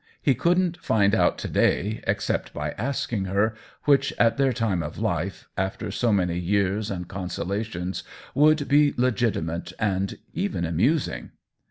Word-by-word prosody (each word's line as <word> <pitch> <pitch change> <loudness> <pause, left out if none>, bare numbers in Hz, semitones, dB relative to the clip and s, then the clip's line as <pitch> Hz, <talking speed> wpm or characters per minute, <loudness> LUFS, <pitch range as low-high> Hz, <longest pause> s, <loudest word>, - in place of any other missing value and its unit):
He 140 - +3
couldn't 175 +5 +1
find 100 -2 +2
out 110 - +3
to - - -4
day 105 +4 +1
except - - -1
by 75 0 -2
asking 115 - -2
her, 100 +4 +1 0.3
which, 140 -1 +3
at 115 -1 +4
their 135 -1 +3
time 110 -7 0
of 75 -2 -6
life, - - -2
after 95 0 -2
so 120 -2 +1
many 90 -4 +1
years 100 +3 0
and 90 -3 -4
consolations, 95 0 -3 0.3
would 150 0 +4
be 145 0 +4
legitimate 110 -9 0
and 100 -2 0 0.2
even 185 - -1
amusing. 120 - 0
105 Hz, 145 wpm, -25 LUFS, 95-135 Hz, 0.3 s, at